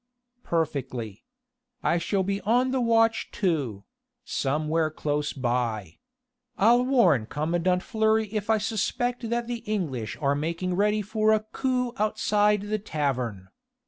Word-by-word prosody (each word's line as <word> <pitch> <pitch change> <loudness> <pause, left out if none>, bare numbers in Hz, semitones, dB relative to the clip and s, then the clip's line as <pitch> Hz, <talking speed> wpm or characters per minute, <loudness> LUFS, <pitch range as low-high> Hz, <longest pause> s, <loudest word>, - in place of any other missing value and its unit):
"Perfectly. 130 - -3 0.6
I 170 - +2
shall 190 +3 0
be 200 +1 -2
on 245 +4 +2
the 260 -1 +1
watch 225 -1 +2
too 145 - -1 0.4
somewhere 155 - 0
close 150 -1 -2
by.... 120 - -2 0.6
I'll 235 +4 +5
warn 190 - +3
commandant 175 +6 0
Fleury 220 0 +2
if 210 0 -3
I 220 - +5
suspect 230 +3 -1
that 235 0 -1
the 240 0 -4
English 155 - -3
are 140 -2 +2
making 170 +5 -2
ready 210 +3 +2
for 215 +1 +2
a 215 - +2
coup 250 +2 -1
outside 210 -1 +2
the 210 +1 -2
tavern. 130 - -2
195 Hz, 130 wpm, -26 LUFS, 145-220 Hz, 0.6 s, I'll